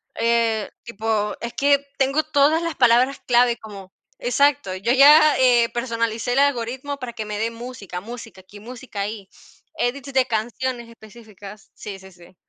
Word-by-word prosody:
Eh, 230 -2 0
tipo, 220 -2 -2
es 235 0 -5
que 280 0 +2
tengo 275 +3 +1
todas 310 +1 +2
las 335 -1 -3
palabras 250 +2 +3
clave 240 -1 +3
como 200 -4 -12 0.3
Exacto, 285 - +1
yo 195 +6 -1
ya, 295 +3 +7
eh, 240 -2 +4
personalicé 230 0 -2
el 270 - +2
algoritmo, 275 +1 -1
para 255 -3 -6
que 220 -2 -6
me 210 0 -5
dé 225 +1 -1
música, 230 -6 -8
música, 225 -2 -10
aquí 205 +2 -15
música 240 -2 -8
ahí. 205 -1 -5 0.5
Edits 275 -1 -3
de 260 -1 +3
canciones 240 +2 -3
específicas. 215 -2 -14
Sí, 200 -2 -8
sí, 190 0 -14
sí. 175 +1 -18
235 Hz, 160 wpm, -22 LUFS, 215-265 Hz, 0.5 s, ya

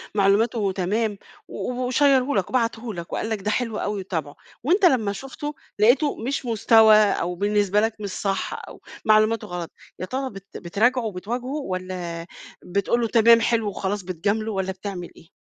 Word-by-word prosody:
معلوماته 205 +1 +2
تمام، 205 +3 -1 0.3
و - - -4 0.2
وشيّره 270 0 +3
لك 195 -3 0
وبعته 230 -2 -1
لك، 170 -2 -8
وقال 220 - -2
لك 220 -3 -2
ده 210 +2 -1
حلو 225 -1 -1
أوي 205 -1 -2
وتابعُه، 160 -6 -4 0.3
وأنت 365 - +3
لما 225 - +3
شفته 270 +6 -6 0.2
لقيته 255 +7 +4
مش 260 +3 -3
مستوى 225 -1 +6
أو 195 -4 +2
بالنسبة 205 +1 +2
لك 220 0 0
مش 205 -1 -4
صح، 195 0 -2
أو - - -12 0.2
معلوماته 215 +1 +3
غلط، 175 -2 -5 0.3
يا - - -3
ترى 265 +6 -3
بت 195 -3 -11
بتراجعه 230 +9 +1
وبتواجهه، 220 +5 -4 0.2
والَّا 180 -2 -5 0.4
بتقول 200 +6 0
له 230 - +1
تمام 230 0 +6
حلو 225 -3 +1
وخلاص 200 0 -3
بتجامله، 200 +5 -1
والَّا 190 -2 -2
بتعمل 190 -2 -6
إيه؟ 165 - -17
210 Hz, 165 wpm, -23 LUFS, 190-235 Hz, 0.4 s, مستوى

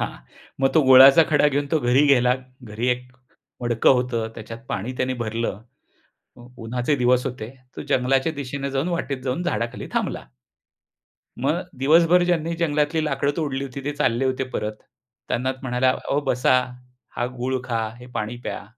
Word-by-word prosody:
हां. - - -3 0.4
मग 135 - +4
तो 160 - +6
गुळाचा 135 +4 +9
खडा 150 -1 +4
घेऊन 145 0 -1
तो 160 - +4
घरी 125 +3 +3
गेला, 125 -2 +4 0.3
घरी 115 +2 -3
एक 125 0 -2 0.5
मडकं 120 -1 +3
होतं, 120 -3 -1
त्याच्यात 115 +1 -9
पाणी 105 +5 -3
त्याने 130 0 -1
भरलं 115 -1 -3 0.8
उ 120 - -13 0.2
उन्हाचे 125 +5 0
दिवस 125 0 +2
होते, 120 -4 -5 0.3
तो - - -5
जंगलाच्या 135 +4 +1
दिशेनं 140 -1 -5
जाऊन, 135 +5 -1
वाटेत 140 -6 -3
जाऊन 130 +7 -2
झाडाखाली 120 -9 -3
थांबला. - - -2 1.2
मग - - +1 0.2
दिवसभर 165 +5 +5
ज्यांनी 170 -2 0
जंगलातली 155 -1 0
लाकडं 140 0 0
तोडली 140 -4 -2
होती, 135 +1 -8
ते 145 - -1
चालले 135 -3 +1
होते 130 0 0
परत. 105 0 -2 0.5
त्यांना 130 +2 -1
म्हणाला, 130 0 +1
"अहो 140 - -2
बसा 125 +1 +3 0.6
हा 120 - 0
गूळ 130 +1 -1
खा, 115 -2 -1
हे 125 - -11
पाणी 110 +3 -3
प्या." - - -4
130 Hz, 160 wpm, -23 LUFS, 120-145 Hz, 1.2 s, गुळाचा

